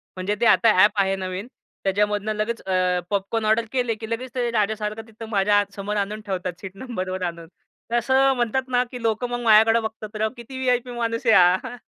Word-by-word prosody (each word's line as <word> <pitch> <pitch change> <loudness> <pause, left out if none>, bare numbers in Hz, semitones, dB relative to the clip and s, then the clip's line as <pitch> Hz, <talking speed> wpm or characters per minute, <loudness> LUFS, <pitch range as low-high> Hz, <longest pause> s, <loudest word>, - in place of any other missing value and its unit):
म्हणजे 190 +3 -2
ते - - +3
आता 225 0 +5
ॲप 210 - +6
आहे 195 0 +1
नवीन 185 +3 -5 0.4
त्याच्यामधनं 205 +2 0
लगेच 215 +2 -3
अ, 185 -1 +1
पॉपकॉर्न 205 +2 -1
ऑर्डर 220 +2 +2
केले, 245 -4 0
की 220 0 -8
लगेच 240 +2 -4
ते 240 -1 0
राजासारखं 215 0 -1
तिथं 225 0 -10
माझ्या 205 0 +3
आ - - +2
समोर 205 +1 -4
आणून 210 +2 -2
ठेवतात 185 -3 -3
सीट 190 -1 -7
नंबरवर 190 -5 -5
आणून. 170 -1 -5 0.4
तर - - +1
असं 265 +3 +3
म्हणतात 250 +2 -1
ना, 250 -1 +2
की 245 - -7
लोकं 230 +2 -1
मग 245 - -3
माझ्याकडं 225 +1 +5
बघतात 220 -1 -7
राव 220 0 +1
किती 240 +3 -9
व्ही-आय-पी 250 -1 0
माणूस 230 0 -3
आहे 225 - +6 0.3
हा. - - -7
220 Hz, 200 wpm, -23 LUFS, 200-235 Hz, 0.4 s, ॲप